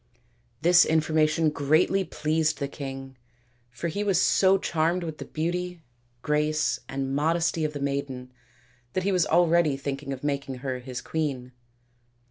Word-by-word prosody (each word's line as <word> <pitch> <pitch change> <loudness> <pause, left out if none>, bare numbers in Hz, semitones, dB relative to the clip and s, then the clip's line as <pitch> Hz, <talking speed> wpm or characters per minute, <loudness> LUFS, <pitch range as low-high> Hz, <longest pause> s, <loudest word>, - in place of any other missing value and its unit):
This 175 +1 +7
information 155 0 +2
greatly 155 +7 +2
pleased 155 -2 0
the 140 - -2
king, 135 -2 -7 0.5
for 120 +8 -5
he 200 +5 -2
was 195 -4 +2
so 190 0 +4
charmed 170 0 0
with 160 -2 -6
the - - -6
beauty, 175 +1 -3 0.4
grace, 150 +2 +1
and 135 0 -3
modesty 165 +2 +1
of 150 - -3
the 145 - -5
maiden 140 -2 -3 0.6
that 185 - -1
he 200 - +1
was 180 -3 +2
already 170 -3 +3
thinking 140 0 -4
of 135 0 -6
making 140 -2 -2
her 130 -1 -2
his 125 0 -6
queen. 135 -6 -3
155 Hz, 145 wpm, -26 LUFS, 140-170 Hz, 0.6 s, This